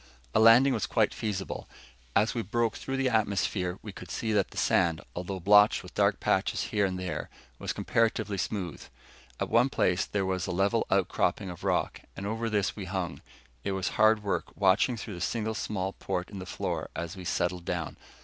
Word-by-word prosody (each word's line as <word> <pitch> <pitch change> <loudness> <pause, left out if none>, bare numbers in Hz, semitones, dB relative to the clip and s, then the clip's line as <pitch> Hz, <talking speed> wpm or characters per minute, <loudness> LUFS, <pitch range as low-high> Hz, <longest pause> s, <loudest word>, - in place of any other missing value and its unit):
A - - +4
landing 115 +5 +7
was 110 -5 -1
quite - - +2
feasible. 100 -3 -4 0.5
As 110 +2 +3
we 120 - -1
broke 115 +2 0
through 135 0 -4
the 135 0 +1
atmosphere, 100 -4 0
we 105 - -6
could 90 -2 -11
see 110 +2 -2
that 100 -3 +2
the - - -13
sand, 85 -4 +2 0.2
although 90 +2 -4
blotched 105 +3 +5
with - - -12
dark - - +2
patches - - +1
here 100 -2 +3
and 90 -1 -3
there, 90 -1 -4 0.3
was - - -2
comparatively 110 -3 0
smooth. 90 -4 -3 0.6
At - - -1
one 120 +4 +5
place 90 -8 +2
there 100 -2 -1
was 95 -2 -1
a - - -2
level 95 +3 +1
outcropping 95 - +1
of 85 - -11
rock, - - 0 0.2
and 100 - -5
over 115 +2 -2
this 105 -2 0
we 100 - -6
hung. 95 -2 -3 0.4
It 100 - -1
was 95 -1 -1
hard 110 0 +4
work, 100 - -1
watching 100 +5 +3
through 105 0 -6
the 90 - -7
single 110 +3 -1
small 95 -3 -2
port 90 0 -4
in 100 - -6
the 90 - -7
floor - - -3
as 85 -1 -4
we 95 - -8
settled 90 0 -1
down. 85 -3 -3
100 Hz, 195 wpm, -29 LUFS, 90-110 Hz, 0.6 s, landing